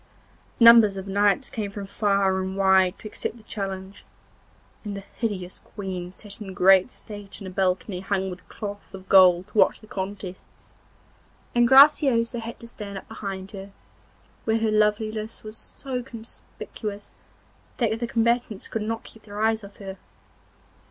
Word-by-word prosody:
Numbers 230 -4 +8
of 190 +1 -6
knights 205 +6 +2
came 210 -3 -3
from 200 0 -6
far 195 -1 +1
and 190 +1 -4
wide 190 -1 +4
to 215 - -9
accept 215 +2 -5
the 225 - -17
challenge, 195 -2 -6 0.8
and 205 -2 -5
the 195 - -8
hideous 190 -6 -3 0.2
Queen 185 -3 -5
sat 205 +3 -6
in 190 -3 -7
great 190 +3 +6
state 205 -5 -9
in 195 - -9
a 185 - -6
balcony 185 0 0
hung 190 0 -1
with 180 - -11
cloth 205 -2 -7
of 190 0 -12
gold 185 -2 +6
to - - -8
watch - - +4
the - - -15
contests, 190 -2 -7 0.8
and 240 0 +4
Graciosa 265 -3 +6
had 230 +1 -7
to 235 - -10
stand 205 -4 -8
up - - -9
behind 195 -3 -6
her, 195 -1 -9 0.7
where 220 0 +2
her 225 -1 +1
loveliness 215 +1 0
was 215 0 -8
so 255 +2 -6
conspicuous 220 -3 -9 0.6
that 225 -2 0
the 235 - -2
combatants 235 -2 0
could 225 - -3
not 225 +1 -3
keep 225 - -15
their 205 -1 -9
eyes 220 0 +1
off 200 0 -12
her. 195 -1 -8
205 Hz, 160 wpm, -25 LUFS, 190-225 Hz, 0.8 s, Numbers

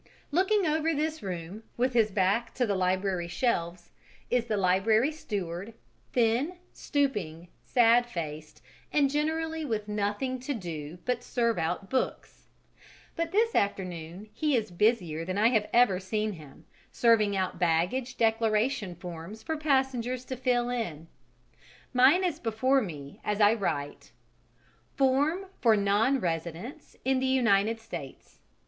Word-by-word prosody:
Looking 380 +5 +2
over 315 0 +1
this 310 +2 -2
room, 180 +1 -6 0.2
with 255 +2 +1
his 225 -3 +3
back 205 +4 0
to 250 - +1
the 205 - 0
library 185 -1 0
shelves, 175 -4 -2 0.4
is 245 -1 +2
the 215 -3 -1
library 205 +8 +3
steward, 200 - -5 0.4
thin, 245 +9 +1 0.2
stooping, 185 - -2
sad 240 0 +4
faced, 155 -7 -7 0.3
and 280 -2 +3
generally 320 +2 -1
with 220 -7 -2
nothing 210 +5 -2
to 265 +3 -3
do 165 -5 -6
but 250 -1 0
serve 235 -5 0
out 175 +4 -2
books; 260 - -3 0.7
but 335 0 -2
this 455 +4 +2
afternoon 185 -1 -2
he 300 -3 +1
is 220 -5 -1
busier 175 -5 +1
than 185 +3 -3
I 220 +3 +5
have 220 -4 +1
ever 235 -6 +4
seen 210 +3 -2
him, 150 -6 -14 0.3
serving 215 -4 +3
out 185 -1 -2
baggage 180 +10 0
declaration 225 -2 +1
forms 175 +4 -8
for 320 - -2
passengers 265 -4 0
to 260 - -4
fill 245 -1 0
in. 165 -10 -4 0.8
Mine 265 +9 +5
is 360 - -1
before 255 +4 +2
me 150 - -8
as 210 0 -1
I 205 0 +6
write: 150 -10 -3 0.8
"Form 285 +8 +2 0.2
for 225 -3 +5
nonresidents 200 - -1
in 265 0 +2
the 260 - 0
United 225 -4 +2
States. 175 -11 -9
225 Hz, 135 wpm, -28 LUFS, 185-260 Hz, 0.8 s, I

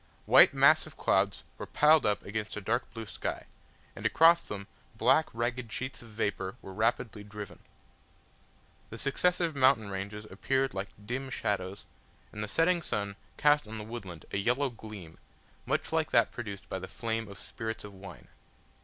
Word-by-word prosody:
White - - +8
massive - - +4
clouds - - +1 0.2
were - - -5
piled 150 -2 +5
up 105 - +1
against 105 +1 -4
a - - -1
dark 115 +5 -1
blue 115 -2 -6
sky, - - -4 0.5
and - - -9
across 165 +1 +5
them 100 -1 -5 0.3
black 130 +8 +4
ragged 120 0 -2
sheets 130 +5 -4
of 120 - -13
vapour 105 -3 -2
were 95 - -10
rapidly 110 0 0
driven. 105 -1 -9 1.3
The 115 - -8
successive 170 +5 +1
mountain 130 -6 +4
ranges 100 +2 -5
appeared 135 +7 0
like 95 +1 -3 0.2
dim 130 +4 -3
shadows, 100 -5 -2 0.5
and 105 - -5
the - - -3
setting 170 - +2
sun 100 -8 -2 0.2
cast 145 -4 +4
on 110 +1 -6
the 105 - -5
woodland 105 -7 -8
a - - -1
yellow 125 +7 +1
gleam, 105 -7 -10 0.5
much - - 0
like - - +1
that - - +4
produced 100 -4 -7
by 95 - -4
the 95 - -7
flame 115 +1 -3
of 100 -1 -11
spirits 110 -2 -5
of 105 -1 -9
wine. 95 -2 -11
110 Hz, 165 wpm, -30 LUFS, 100-130 Hz, 1.3 s, White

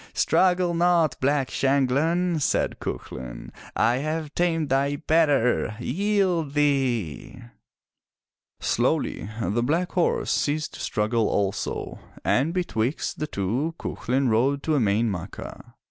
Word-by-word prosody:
"Struggle 180 -1 +3
not. 170 -4 +3
Black 140 0 +1
Shanghlan,*' 145 +6 +1
said - - 0
Cuchulain. 60 -2 -6 0.2
"I 115 +3 +3
have 155 +1 -3
tamed 165 -4 0
thy 140 +2 +1
better! 145 -8 +2
Yield 180 - 0
thee! 130 - 0 0.4
' - - -66
' - - -63
Slowly 100 - 0
the 110 +2 0
black 165 +8 0
horse 180 -2 +1
ceased 155 +1 0
to - - -10
struggle 110 +1 0
also, 100 0 -2 0.3
and 140 +6 +2
betwixt 155 -8 -2
the 155 - -2
two 125 - -2
Cuchulain 130 +2 -1
rode 135 +6 +1
to 160 - -1
Emain 110 -3 +2
Macha. 95 -2 -7
140 Hz, 120 wpm, -25 LUFS, 115-165 Hz, 0.4 s, Struggle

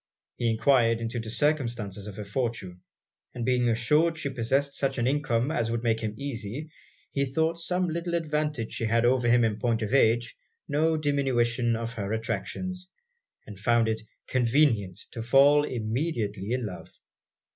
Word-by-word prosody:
He 120 - +1
enquired 115 0 +3
into 115 +1 -3
the 115 -1 -6
circumstances 115 -8 -1
of 105 - -7
her 105 - -5
fortune; 100 -5 -3 0.5
and 120 -2 -3
being 125 -1 +2
assured 150 +9 +2
she 140 -4 -3
possessed 135 +4 0
such 135 -1 -1
an 120 - 0
income 130 -1 +1
as 115 -7 0
would 115 0 -2
make 115 -1 +1
him 110 -2 -3
easy, 140 +3 -5 0.4
he 140 - 0
thought 160 +5 0
some 180 +2 0
little 170 +1 -2
advantage 150 -7 -1
she 115 - -2
had 115 +1 +2
over 125 0 +3
him 120 0 +5
in 110 -2 0
point 115 -2 0
of 110 - -3
age 120 -2 +3 0.3
no 160 +3 +2
diminution 125 -5 +1
of 115 0 -4
her 105 -2 -3
attractions, 185 +11 -4 0.6
and 105 -2 -10
found 115 +2 +3
it 110 0 -1 0.2
convenient 115 - +2
to 115 - -6
fall 140 +5 +5
immediately 110 - -2
in 125 -1 -1
love. 90 -4 -8
120 Hz, 165 wpm, -27 LUFS, 115-145 Hz, 0.6 s, him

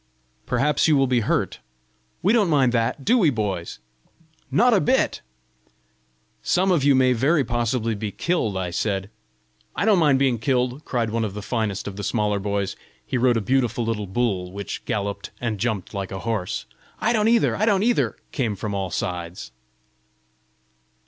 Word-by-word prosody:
"Perhaps 150 +2 +2
you 155 -2 +4
will 135 - +4
be 125 -2 +2
hurt!" 110 - -1 0.6
"We 200 +5 +4
don't 210 -6 +3
mind 135 -5 +3
that! 120 +3 -1
Do 245 +3 +4
we, 175 -8 +4
boys?" 100 -8 -3 0.7
"Not 240 +3 +4
a 200 - +4
bit!" 260 +2 +1 1.2
"Some 185 +1 +2
of 165 -6 +2
you 140 -1 +5
may 130 -1 +4
very 140 +6 +2
possibly 120 -1 -1
be 105 0 -4
killed!" 115 - -1
I 90 -2 -2
said. 100 +1 -2 0.6
"I - - 0
don't 210 -4 +4
mind 145 -5 +4
being 130 -4 +1
killed!" 125 +3 0
cried 115 -3 -1
one 115 0 0
of 105 -2 -4
the 105 - -6
finest 110 -5 -2
of 100 -1 -6
the 100 - -5
smaller 105 -2 0
boys: 100 -1 -2 0.3
he - - -4
rode 125 -1 +3
a - - 0
beautiful 120 +1 0
little 110 -3 -2
bull, 95 -3 -1
which 100 -1 -6
galloped 100 -1 -3
and 115 -4 -2
jumped 110 -5 -2
like 100 -2 -4
a 95 -1 -5
horse. 105 -3 -2 0.3
"I 225 - +1
don't 215 -1 +2
either! 230 0 +3
I 215 - 0
don't 200 -2 +3
either!" 240 +1 +1 0.2
came 115 -8 -1
from 100 +1 -4
all 95 -2 -2
sides. 85 +1 -4
120 Hz, 175 wpm, -23 LUFS, 100-145 Hz, 1.2 s, you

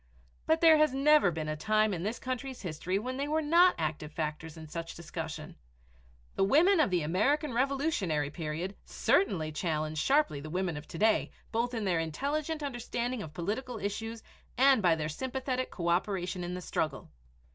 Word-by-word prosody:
But 320 +1 +3
there 325 -2 +8
has 305 -3 +3
never 290 -5 +5
been 160 -2 -4
a 155 - -2
time 215 +6 +2
in 170 - -3
this 215 +6 -2
country's 260 -1 -5
history 180 +2 -2
when 255 +5 -4
they 280 +1 -2
were 310 +2 +1
not 345 +4 +5
active 155 -1 -3
factors 155 +1 -4
in 160 -1 -9
such 165 +1 -6
discussion. 160 -2 -7 0.8
The - - +1
women 325 - +5
of 305 - +4
the 180 -3 +1
American 255 - +1
Revolutionary 240 - 0
Period 165 +4 -4
certainly 160 - +1
challenge 155 -1 -2
sharply 275 - +2
the 155 +2 -8
women 180 0 -1
of 150 +1 -8
to - - -8
day, 220 +4 +3 0.2
both 235 +2 0
by 230 - -2
their 185 -5 +1
intelligent 290 - -2
understanding 245 -2 -3
of 155 -3 -9
political 220 +8 -3
issues 220 +2 -4 0.3
and 265 -2 +5
by 175 -4 +4
their 155 -1 -2
sympathetic 255 - -3
coöperation 180 +1 -1
in 175 +1 -4
the 180 - -5
struggle. 140 - -3
195 Hz, 175 wpm, -30 LUFS, 160-265 Hz, 0.8 s, there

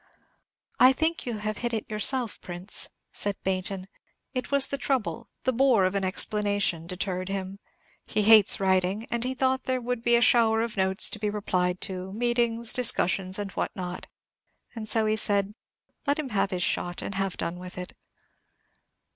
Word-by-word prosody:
"I 255 +1 +7
think 320 +1 -2
you 235 -3 -3
have 215 0 -4
hit 240 -1 -2
it 220 - -4
yourself, 225 +2 0
Prince," 180 +3 +1 0.2
said 205 -1 0
Baynton. 190 0 -2 0.5
"It 255 -2 -4
was 280 -1 +5
the 280 - -2
trouble, 240 -4 -2
the 260 - +1
bore 245 -6 +3
of 185 - 0
an 200 -1 -1
explanation, 200 -3 0
deterred 185 0 -3
him. 195 0 -5 0.5
He 210 - 0
hates 215 -1 +7
writing, 190 +2 0
and 235 0 -1
he 255 +1 -2
thought 260 0 0
there 255 0 0
would 245 -1 -3
be 235 0 +3
a - - +4
shower 225 -1 +4
of 230 -2 -5
notes 190 0 +3
to 215 - -5
be 210 0 -1
replied 185 -3 -1
to, 190 -1 -5
meetings, 235 0 0
discussions, 190 -6 +2
and 205 -1 -4
what - - -3
not; 180 -1 -6 0.7
and 220 -2 -7
so 220 0 +2
he 215 0 +1
said, 200 -1 0 0.5
'Let 285 - +2
him 300 -4 -4
have 200 -3 0
his 180 -2 -1
shot, 175 0 -1
and - - -5
have 195 -1 -2
done 175 +1 -4
with 180 0 -10
it.'" 180 0 -7
210 Hz, 180 wpm, -26 LUFS, 190-235 Hz, 0.7 s, I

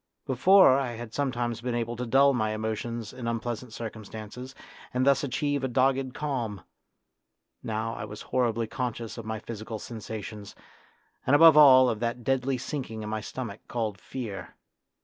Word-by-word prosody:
Before 140 +1 +6
I 125 -3 -2
had 115 -1 -8
sometimes 120 -5 -1
been 125 -1 -2
able 120 0 -2
to 125 0 -3
dull 140 +3 +5
my 110 -3 0
emotions 110 +1 -4
in 125 -2 -6
unpleasant 115 +1 -3
circumstances 110 +3 -8 0.4
and 125 +1 +1
thus 140 +1 +4
achieve 145 +1 -1
a - - +1
38 - - -7
A - - -10
DEAMA 130 +2 +5
OF - - -5
YOUTH 135 - -2
dogged 130 - -10
calm; 120 - -3 1.0
now 110 +1 -3
I 105 -2 -5
was 105 0 -9
horribly 115 -2 0
conscious 120 -1 -4
of 115 - -8
my 110 0 -3
physical 110 +1 -6
sensations, 110 -2 -7 0.7
and, 135 - +5
above 165 0 +8
all, 130 -4 +8
of 110 -3 -1
that 120 +1 -2
deadly 135 +1 +1
sinking 125 -4 -5
in 105 - -5
my 110 0 -2
stomach 110 -2 -6
called 110 -4 -3
fear. 110 -8 -6
120 Hz, 180 wpm, -27 LUFS, 110-130 Hz, 1.0 s, above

